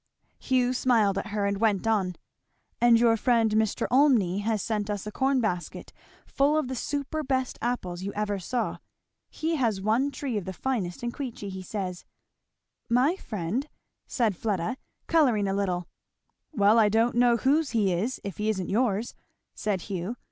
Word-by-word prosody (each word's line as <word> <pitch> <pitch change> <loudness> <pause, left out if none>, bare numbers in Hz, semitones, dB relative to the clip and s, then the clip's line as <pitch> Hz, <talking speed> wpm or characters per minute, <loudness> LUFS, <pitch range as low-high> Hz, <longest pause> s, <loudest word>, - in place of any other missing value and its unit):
Hugh 255 -1 +1
smiled 220 -6 +2
at 195 - -5
her, 210 -1 -1
and 200 0 -1
went 210 -3 +1
on. 195 -5 +1 0.7
"And 235 -1 +6
your 230 -1 +4
friend 225 -1 +2
Mr. 215 -1 +1
Olmney 240 -9 +4
has 215 -1 -1
sent 210 -2 -2
us 205 -1 -3
a 210 - -5
corn 265 +3 +1
basket 180 -6 -3 0.3
full 285 +3 +2
of 305 -4 0
the 260 - -3
superbest 275 -1 -2
apples 185 -8 -2
you 195 +1 -3
ever 205 -1 -2
saw. 240 +6 -2 0.5
He 325 0 -2
has 225 -7 +1
one 225 +8 +1
tree 265 -4 -3
of 200 - -4
the 190 - -5
finest 205 -5 -3
in 240 - -1
Queechy, 235 -7 -6
he 190 0 -6
says." 185 -2 -5 0.9
"My 255 +8 +3
friend!" 220 - -3 0.4
said 225 -6 0
Fleda, 210 +4 -2 0.3
colouring 250 -11 +3
a 195 - 0
little. 180 -3 -1 0.6
"Well 215 -3 +4
I 215 -2 +5
don't 225 +3 +2
know 240 0 +4
whose 280 +5 +2
he 205 -5 +1
is 215 +9 -2
if 200 -4 -6
he 210 +1 -1
isn't 190 -4 -2
yours," 225 0 0 0.4
said 205 -4 -2
Hugh. 195 +4 -4
220 Hz, 170 wpm, -27 LUFS, 200-255 Hz, 0.9 s, And